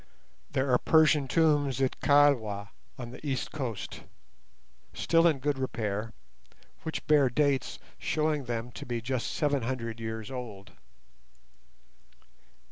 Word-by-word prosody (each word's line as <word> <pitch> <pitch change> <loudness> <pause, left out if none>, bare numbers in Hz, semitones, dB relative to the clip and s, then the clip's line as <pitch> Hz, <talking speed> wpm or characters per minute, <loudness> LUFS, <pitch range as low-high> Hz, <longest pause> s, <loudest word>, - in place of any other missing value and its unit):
There 130 0 0
are 125 - +5
Persian 155 -3 +4
tombs 145 -2 +2
at 130 -1 0
Kilwa, 120 -9 +3 0.3
on 120 -3 -7
the 125 - -11
east 135 -4 -2
coast, 120 -9 -5 0.9
still 165 0 +4
in 160 -4 +3
good 140 0 -1
repair, 110 -4 -2 0.7
which 160 - -5
bear 145 -3 +5
dates 140 0 +1 0.2
showing 155 -3 0
them 120 0 -3
to - - -8
be 120 -1 -2
just 125 +1 -2
seven 145 -3 0
hundred 115 -1 -3
years 110 +1 -5
old. 110 -7 -7
130 Hz, 125 wpm, -29 LUFS, 115-145 Hz, 0.9 s, are